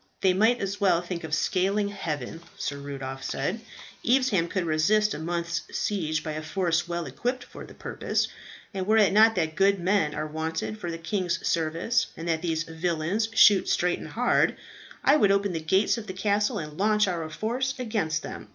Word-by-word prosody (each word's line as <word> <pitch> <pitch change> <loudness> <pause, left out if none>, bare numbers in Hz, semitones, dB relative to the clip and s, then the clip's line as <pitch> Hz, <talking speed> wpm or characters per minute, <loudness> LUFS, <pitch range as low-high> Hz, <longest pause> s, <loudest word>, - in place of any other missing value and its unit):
"They 190 -1 +4
might 220 +6 +3
as 200 +1 -3
well 185 -4 +4
think 175 -1 -5
of 160 - -6
scaling 195 +6 +1
heaven," 165 -6 -5 0.2
Sir 140 0 -3
Rudolph 135 -1 -6
said. 180 +11 -2 0.4
"Evesham 240 -9 +2
could 185 0 -2
resist 205 +7 +2
a - - -5
month's 170 +1 -2 0.2
siege 155 -7 -1
by 155 - -4
a 155 0 -4
force 170 +1 0
well 170 -1 -3
equipped 250 +1 -3
for - - -11
the - - -14
purpose; - - -2 0.5
and 190 -1 -3
were 220 +1 +4
it 205 -3 +5
not 220 +2 +6
that 160 -3 0
good 195 +2 +3
men 175 -4 +1
are - - -2
wanted 160 +7 -4
for 175 - -4
the 165 - -4
king's 175 +1 -2
service, 170 +8 +1
and 165 - -6
that 160 -1 0
these 165 -2 -1
villains 170 +6 -1
shoot 200 -3 +6
straight 180 0 +1
and - - -8
hard, - - +2 0.5
I 285 +3 +5
would 205 -8 +4
open 200 -1 +1
the 165 - -2
gates 190 +8 +2
of 215 - -9
the 185 - -5
castle 205 +3 0
and 150 -3 -7
launch 210 0 +3
our 165 -3 -2
force 245 +10 -2
against 205 -11 -1
them. - - -8
180 Hz, 195 wpm, -26 LUFS, 160-210 Hz, 0.5 s, not